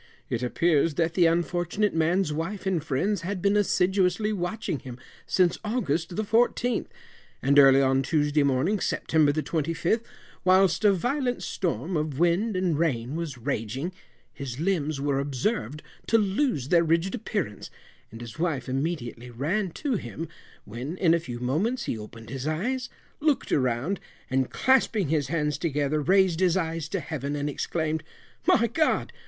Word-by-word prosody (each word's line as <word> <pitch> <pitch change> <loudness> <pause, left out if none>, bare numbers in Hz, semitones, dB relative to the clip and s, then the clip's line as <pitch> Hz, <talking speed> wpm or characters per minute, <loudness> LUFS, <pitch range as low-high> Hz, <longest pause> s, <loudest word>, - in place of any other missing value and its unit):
It 115 - -1
appears 155 +4 +2
that 165 +1 +1
the 175 -2 +4
unfortunate 175 +4 0
man's 165 +1 +1
wife 175 +7 -4
and 180 -5 0
friends 170 +7 0
had 185 +2 -3
been 200 +3 +2
assiduously 190 +1 +2
watching 180 -4 -3
him 125 -2 -9 0.3
since 180 -2 +2
August 180 - -1
the 215 - 0
14th, 235 +2 +1 0.6
and 140 +2 +5
early 135 0 +7
on 135 0 +3
Tuesday 150 +1 +1
morning, 140 +9 +1
September 155 -5 +2
the 155 +1 -2
25th, 165 +7 0 0.4
whilst 185 -1 +4
a 205 - +6
violent 245 - -1
storm 175 0 -2
of 150 -3 -2
wind 175 +6 +2
and 180 -5 0
rain 135 -5 0
was 165 -6 -4
raging, 130 - -3 0.4
his 135 -2 -6
limbs 155 -5 0
were 140 -1 0
observed 140 - -2 0.2
to 225 - +4
lose 200 - 0
their 170 -1 +5
rigid 165 +3 +1
appearance, 205 - -3 0.4
and 115 +1 -10
his 120 +4 -9
wife 155 -7 -1
immediately 130 -3 -3
ran 165 - -1
to 260 - -2
him, 165 -2 -6 0.4
when, 125 - -6
in 170 -4 +4
a 170 - +3
few 125 -7 -7
moments 190 - 0
he - - -2
opened 110 +1 -10
his 135 +1 -4
eyes, 245 +11 -1 0.3
looked 300 -2 +1
around, 130 +8 0 0.3
and 130 -1 +1
clasping 230 - +2
his 150 -3 +1
hands 150 -2 -1
together, 150 -2 0
raised 185 0 +3
his 185 -1 +3
eyes 165 -3 -2
to 195 - -1
Heaven, 145 -2 -4
and 145 0 -2
exclaimed, 155 +2 -2 0.5
"My 235 - +5
God! 310 +8 0
165 Hz, 160 wpm, -26 LUFS, 140-195 Hz, 0.6 s, early